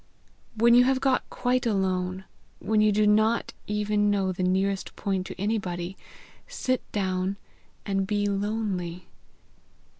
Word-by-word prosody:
"When 235 +2 +5
you 245 +1 +7
have 265 0 +2
got 265 -1 +1
quite 250 -1 0
alone, 190 -2 -1 0.3
when 215 -1 +1
you 215 0 +4
do 210 +1 +3
not 215 +2 +2
even 210 0 +1
know 195 -2 +1
the 185 - -5
nearest 190 +1 0
point 190 -2 -2
to - - -9
anybody, 190 -4 -2 0.5
sit 255 -1 -2
down 190 -1 -1 0.5
and 195 -1 0
be 205 0 0
lonely. 200 -4 -2
205 Hz, 130 wpm, -26 LUFS, 190-215 Hz, 0.5 s, you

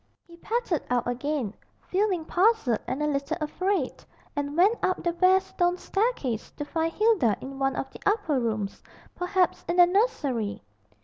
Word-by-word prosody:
He 340 - -15
pattered 440 - -1
out 245 -1 +1
again, 245 -2 -2 0.3
feeling 375 -4 0
puzzled 360 - +2
and 265 +4 -2
a - - +1
little 290 +2 -1
afraid, 340 0 -1 0.3
and 290 +1 -3
went 405 +7 +4
up 370 - 0
the 345 0 0
bare 370 +2 +5
stone 355 -1 0
staircase 390 - -1
to 295 - -5
find 325 +2 -1
Hilda 375 - +3
in 270 +1 -8
one 270 0 +1
of - - -3
the - - -11
upper 405 -10 +1
rooms, 215 -4 -2 0.3
perhaps 360 0 0
in 345 - +1
the 355 -1 +8
nursery. 285 - 0
330 Hz, 165 wpm, -27 LUFS, 270-375 Hz, 0.3 s, the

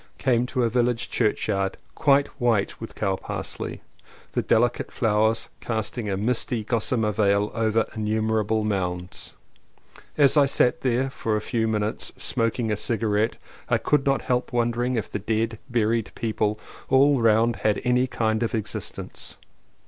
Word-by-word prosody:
Came 125 -2 +2
to 125 -1 0
a 115 - +2
village 120 -1 0
churchyard 95 0 0 0.2
quite 140 0 +4 0.2
white 115 -5 +1
with 115 - -8
cows 95 -2 -1
parsley, - - -5 0.5
the - - 0
delicate 120 +2 +1
flowers 110 0 +1
casting 110 0 -3
a 95 - -1
misty 115 +1 0
gossamer 110 0 0
veil 100 0 +2
over 110 -1 +1
innumerable 110 0 0
mounds. 90 -3 -3 0.8
As 145 0 +5
I 140 -1 +6
sat 125 -2 +2
there 130 +1 +1
for 115 -5 -1
a - - +1
few 110 +1 -1
minutes 105 0 -2
smoking 115 0 0
a 105 - 0
cigarette 110 -1 0 0.3
I - - +4
could 150 -2 +1
not 135 -2 +1
help 125 0 0
wondering 120 +1 0
if 110 - -2
the - - -4
dead, 110 +2 -1
buried 115 -2 +1
people 110 -2 -1 0.3
all 135 0 +5
round 115 +1 +3
had 105 -1 +1
any 125 +1 +3
kind 110 -2 0
of 115 +1 0
existence. 105 -2 -5
115 Hz, 150 wpm, -25 LUFS, 105-120 Hz, 0.8 s, I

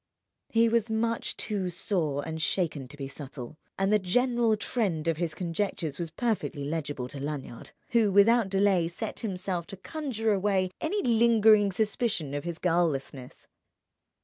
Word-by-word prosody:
He 230 0 +4
was 230 -1 +1
much 230 +1 -1
too 200 -4 -2
sore 160 -5 -1
and 160 0 -4
shaken 160 -6 -1
to 145 +3 -13
be 135 -2 -5
subtle; 135 +1 -9 0.2
and 195 +2 +2
the 210 - +5
general 235 +3 +2
trend 200 -7 -1
of 165 -2 +1
his 170 -2 -2
conjectures 170 -4 -2
was 170 -1 -3
perfectly 195 - -2
legible 145 -4 -3
to 140 - -7
Lanyard, 140 -4 -6 0.2
who 230 -4 +3
without 210 +2 +5
delay 195 -3 +3
set 170 - -5
himself 185 -4 -3
to 195 - -8
conjure 225 - -2
away 190 -2 +1
any 395 +6 -1
lingering 220 -3 +5
suspicion 210 - -1
of 145 +2 -3
his 170 -1 -4
guilelessness. 155 -8 -1
190 Hz, 150 wpm, -28 LUFS, 160-220 Hz, 0.2 s, the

